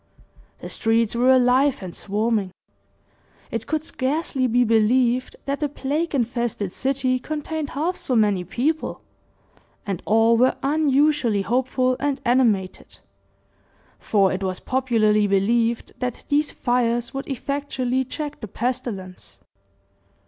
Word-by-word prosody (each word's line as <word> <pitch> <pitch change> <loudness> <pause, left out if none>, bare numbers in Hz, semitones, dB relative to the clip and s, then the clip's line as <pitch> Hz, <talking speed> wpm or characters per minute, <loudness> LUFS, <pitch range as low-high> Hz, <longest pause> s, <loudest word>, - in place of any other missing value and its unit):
The - - -7
streets 225 0 +1
were 245 +2 +3
alive 260 -1 +4
and 180 -2 -7
swarming 210 -1 -1 1.0
it - - -4
could 310 -1 -1
scarcely 270 -2 -1
be 245 +1 +3
believed 240 +3 +2
that 280 0 -2
the 295 - -1
plague 290 +4 -2
infested 235 -5 -1
city 260 0 0
contained 310 +1 -4
half 340 +5 0
so 255 - -1
many 205 -5 +2
people, 280 - -2 0.8
and 195 -5 -3
all 225 +2 +4
were 255 +2 +3
unusually 280 -6 +2
hopeful 255 +2 0
and 285 -1 -1
animated; 230 -7 +1 1.0
for 195 -3 +2
it 190 - -3
was 185 -1 -2
popularly 220 -5 +2
believed 225 +4 +1
that 250 -2 -4
these 290 +1 +2
fires 240 0 0
would 270 0 -5
effectually 265 -1 -2
check 295 +3 -6
the 215 - -5
pestilence. 220 -5 -5
250 Hz, 120 wpm, -23 LUFS, 220-275 Hz, 1.0 s, alive